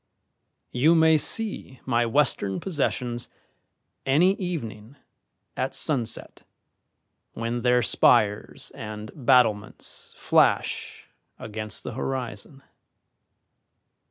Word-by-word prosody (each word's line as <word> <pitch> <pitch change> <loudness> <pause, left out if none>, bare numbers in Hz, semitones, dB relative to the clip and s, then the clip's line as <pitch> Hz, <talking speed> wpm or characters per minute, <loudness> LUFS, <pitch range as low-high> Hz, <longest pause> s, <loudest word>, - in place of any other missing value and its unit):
You 150 +7 +4
may 160 -1 +5
see 200 - -2
my 120 0 +1
western 115 -7 +1
possessions 125 -8 -2 0.7
any 165 +8 +4
evening 125 - -5 0.6
at - - -2
sunset 125 -7 -1 0.9
when 115 +1 -3
their 125 0 +3
spires 105 0 +3
and 105 0 -7
battlements 125 -6 +1
flash - - +1 0.3
against 110 -1 -5
the - - -5
horizon. 130 +1 -5
125 Hz, 80 wpm, -25 LUFS, 110-145 Hz, 0.9 s, may